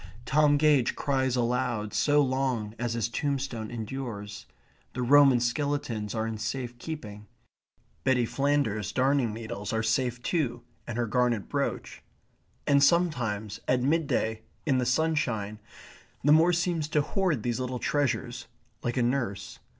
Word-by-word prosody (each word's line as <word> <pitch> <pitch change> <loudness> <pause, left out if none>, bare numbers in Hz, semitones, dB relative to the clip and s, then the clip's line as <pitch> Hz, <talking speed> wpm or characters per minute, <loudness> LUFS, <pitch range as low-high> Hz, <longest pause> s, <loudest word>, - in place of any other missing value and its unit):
Tom 145 +2 +4
Gage 145 -4 +3
cries 130 -2 0
aloud 120 -3 -1
so 145 +7 +3
long 130 -5 -1
as 120 -1 -1
his 115 -1 0
tombstone 130 -4 -2
endures. 110 -3 -6 0.5
The 125 - -2
Roman 135 0 +6
skeletons 120 -4 -2
are 110 0 -1
in 110 -1 -4
safe 120 +2 -4
keeping. 105 -10 -7 0.8
Betty 130 -3 +3
Flanders's 115 -7 0
darning 130 -1 +2
needles 105 -2 -5
are 110 0 0
safe 125 +2 0
too 125 -8 -1 0.2
and 115 - -4
her 120 - +1
garnet 120 -1 +1
brooch. - - -3 0.6
And 140 -1 +4
sometimes 120 - +1
at 125 -1 +2
midday, 135 -7 0 0.2
in 135 -4 +2
the 125 - 0
sunshine, 125 -8 0 0.6
the 145 - +4
moor 160 +3 +6
seems 175 -3 0
to 150 -1 +1
hoard 170 - 0
these 120 0 -1
little 125 0 -2
treasures, 125 -2 -1 0.3
like 120 +1 -2
a 125 - +3
nurse. 120 -6 -2
125 Hz, 140 wpm, -28 LUFS, 110-145 Hz, 0.8 s, Roman